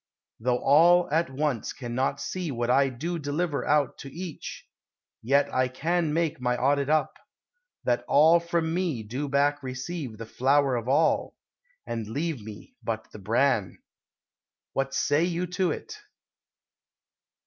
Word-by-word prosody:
Though 125 +2 +1
all 170 +7 +5
at 165 +2 +2
once 135 -3 -2
cannot 125 0 -2
See 180 -3 -4
what 120 -2 -1
I 135 +1 +4
do 165 +8 -4
deliver 150 +1 -1
out 145 -2 +1
to 135 - -8
each, 170 0 -7 0.5
Yet 140 +5 +2
I 130 0 +2
can 160 +5 -1
make 165 -2 -1
my 125 0 +1
audit 140 +2 +1
up, 155 0 +1 0.6
that 120 -1 +1
all 160 +4 +6
From 170 -1 -1
me 170 -10 -1
do 130 +7 -4
back 145 +1 +2
receive 130 -1 -5
the 115 - -7
flour 135 +3 +2
of 120 0 -3
all, 145 +5 +2 0.5
And 115 -2 -4
leave 145 +1 -3
me 105 - -11
but 110 -1 -4
the - - -10
bran." 115 -1 +1 1.0
What 135 0 -1
say 150 +2 +2
you 175 0 -1
to 180 -1 0
't? 450 - -11
140 Hz, 145 wpm, -27 LUFS, 125-165 Hz, 1.0 s, all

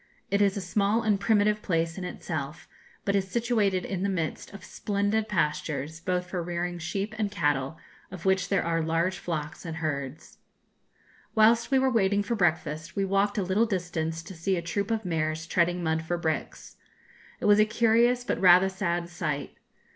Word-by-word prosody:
It 200 0 +2
is 200 0 +3
a - - -2
small 205 +4 +1
and 210 -3 +2
primitive 210 0 +2
place 165 -3 0
in 190 - -6
itself, 155 -3 -5 0.4
but 200 - +1
is 195 -1 +1
situated 215 -4 +1
in 190 -2 -3
the 200 - 0
midst 165 -5 -3
of 200 -2 -11
splendid 205 +1 -1
pastures, 150 -4 -1
both 180 0 -1
for 180 -1 -4
rearing 175 +1 -3
sheep 195 +5 -3
and 210 -2 +1
cattle, 145 -5 0 0.3
of 185 -2 -9
which 190 -1 +2
there 195 - +2
are 165 0 +1
large 165 +3 0
flocks 155 -3 -4
and 165 -2 -5
herds. 145 -3 -4 1.0
Whilst 225 +1 +5
we 270 - +3
were 265 0 +3
waiting 205 -3 +2
for 205 - -2
breakfast, 160 -5 0
we 195 - +1
walked 195 +2 +1
a 200 - +1
little 195 +5 +2
distance 165 -4 -2
to 180 - -9
see 185 +3 -1
a - - -1
troop 200 +5 -2
of 225 -2 -1
mares 160 -2 -1
treading 175 +1 +1
mud 160 0 0
for 175 +2 -2
bricks. 160 -4 -4 0.6
It - - -4
was 205 0 +6
a 215 - +6
curious, 235 +2 +3
but - - -2
rather 185 +1 +7
sad 175 -3 -2
sight. 155 -5 -3
185 Hz, 185 wpm, -27 LUFS, 165-205 Hz, 1.0 s, rather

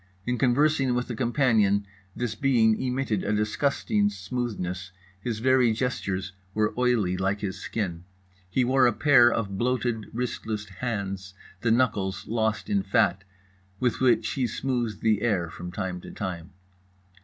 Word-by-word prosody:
In 125 0 -1
conversing 135 0 +3
with 125 0 -2
a - - -3
companion 110 -5 +2 0.3
this 120 -3 -2
being 110 -2 +3
emitted 125 -5 -1
a - - -1
disgusting 105 -1 +1
smoothness, 95 -3 -4 0.3
his 115 +2 -3
very 125 0 +3
gestures 100 -6 -2 0.2
were 105 0 +1
oily 120 -7 +2
like 95 +2 -1
his 95 -2 -4
skin. 90 -7 -4 0.4
He 125 +7 +2
wore 130 0 +4
a 120 - +2
pair 125 -3 +6
of 100 -4 -2
bloated 120 -3 0
wristless 110 -3 -3
hands, 95 -3 -4 0.2
the 115 - 0
knuckles 105 -6 +1
lost 110 -1 0
in 205 -2 +1
fat, 100 - +2 0.6
with 125 -2 0
which 130 -2 +3
he 130 -3 0
smoothed 120 -3 -2
the 110 -2 +2
air 90 -8 0
from 90 0 -7
time 90 -2 -4
to - - -10
time. 90 -3 -5
110 Hz, 145 wpm, -26 LUFS, 100-125 Hz, 0.6 s, pair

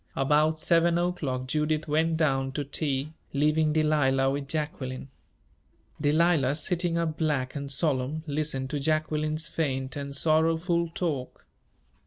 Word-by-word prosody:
About 150 +3 +2
seven 170 +1 +3
o'clock 160 -8 -1
Judith 150 +2 -1
went 160 +2 +1
down 135 -4 +1
to 145 - -2
tea, 145 +1 -2 0.2
leaving 150 +2 +2
Delilah 145 -4 +2
with 140 0 -3
Jacqueline. 140 -3 -4 0.9
Delilah, 150 -2 +3
sitting 170 +2 0
up 165 -2 -2
black 145 -5 0
and 140 -1 -4
solemn, 145 0 -1
listened 145 -3 -2
to 145 - -1
Jacqueline's 155 +1 0
faint 135 -5 -2
and 140 -1 -5
sorrowful 165 +3 +2
talk. 145 -8 -3
150 Hz, 125 wpm, -27 LUFS, 140-160 Hz, 0.9 s, seven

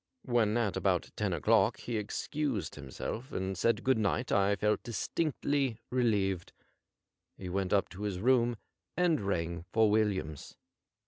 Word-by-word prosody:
When 120 -3 +2
at 105 -6 0
about - - 0
ten - - -1
o'clock - - +3
he 120 - -5
excused 110 - -2
himself 75 - -6
and 95 +1 -2
said 115 +6 +1
good 130 -3 +3
night 110 +4 0
I 100 0 +3
felt 105 +1 +1
distinctly 140 +1 -1
relieved. 100 -8 +1 0.8
He 95 - -6
went 95 0 -1
up 100 -1 +3
to 95 - -10
his 100 -3 -2
room 120 +2 +3 0.4
and 175 -4 +3
rang 85 -4 -2
for 110 -2 +4
Williams. 95 -9 -1
105 Hz, 140 wpm, -31 LUFS, 95-120 Hz, 0.8 s, for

